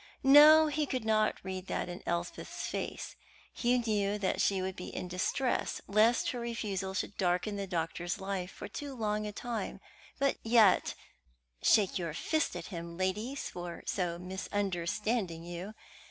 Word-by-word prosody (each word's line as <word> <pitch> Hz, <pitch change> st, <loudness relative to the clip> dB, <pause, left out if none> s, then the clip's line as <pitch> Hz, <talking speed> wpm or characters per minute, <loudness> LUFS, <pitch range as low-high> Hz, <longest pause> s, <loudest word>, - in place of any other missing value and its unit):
No, 300 Hz, +3 st, +9 dB
he 300 Hz, -1 st, 0 dB
could 255 Hz, -4 st, -2 dB
not 215 Hz, -1 st, +2 dB
read 190 Hz, 0 st, -5 dB
that -, -, -2 dB
in 175 Hz, 0 st, -7 dB
Elspeth's 170 Hz, 0 st, -3 dB
face. -, -, -4 dB, 0.4 s
He 245 Hz, +1 st, +2 dB
knew 210 Hz, -4 st, 0 dB
that 195 Hz, -2 st, 0 dB
she 195 Hz, -1 st, +2 dB
would 185 Hz, 0 st, -3 dB
be 180 Hz, -, -7 dB
in 180 Hz, -, -5 dB
distress 185 Hz, +8 st, -1 dB
lest 220 Hz, +4 st, +3 dB
her 245 Hz, -, -4 dB
refusal 205 Hz, -5 st, -3 dB
should 200 Hz, -, -2 dB
darken 180 Hz, +2 st, +1 dB
the 200 Hz, -1 st, -3 dB
doctor's 175 Hz, 0 st, -2 dB
life 190 Hz, -2 st, -3 dB
for -, -, -8 dB
too 275 Hz, +6 st, -6 dB
long 210 Hz, -2 st, -1 dB
a -, -, -4 dB
time; 235 Hz, +2 st, -4 dB, 0.4 s
but 275 Hz, 0 st, +1 dB
yet 225 Hz, -4 st, +4 dB, 0.7 s
(shake 200 Hz, -3 st, +4 dB
your 165 Hz, -3 st, -3 dB
fist 315 Hz, -, 0 dB
at -, -, -5 dB
him, 170 Hz, 0 st, -6 dB
ladies, 210 Hz, +9 st, -2 dB
for 175 Hz, -1 st, -7 dB
so 175 Hz, -3 st, -1 dB
misunderstanding 190 Hz, 0 st, -2 dB
you!) 175 Hz, +5 st, -7 dB
200 Hz, 155 wpm, -32 LUFS, 180-230 Hz, 0.7 s, No